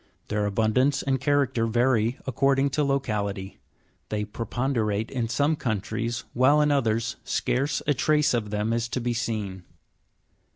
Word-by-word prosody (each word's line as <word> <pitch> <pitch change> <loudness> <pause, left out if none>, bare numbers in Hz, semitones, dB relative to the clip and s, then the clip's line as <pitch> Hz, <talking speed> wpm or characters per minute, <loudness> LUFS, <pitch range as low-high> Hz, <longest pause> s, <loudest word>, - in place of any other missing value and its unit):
Their 105 0 0
abundance 110 +7 +2
and 135 -2 0
character 135 -5 +1
vary 120 +1 +2
according 135 +2 +2
to 150 +2 +1
locality; 105 -8 -2 0.5
they 105 -1 -2
prepon 120 +5 -3
derate 110 -2 -1
in 120 -4 -2
some 145 +6 +2
countries, 115 -2 -2
while 130 +5 +4
in 150 0 +3
others 115 -4 0
scarce 135 +3 -1
a 145 - +3
trace 150 +1 +2
of 115 -3 -1
them 105 +2 -1
is 115 0 0
to 130 - -2
be 120 0 -1
seen. 105 -5 -3
120 Hz, 150 wpm, -26 LUFS, 110-135 Hz, 0.5 s, while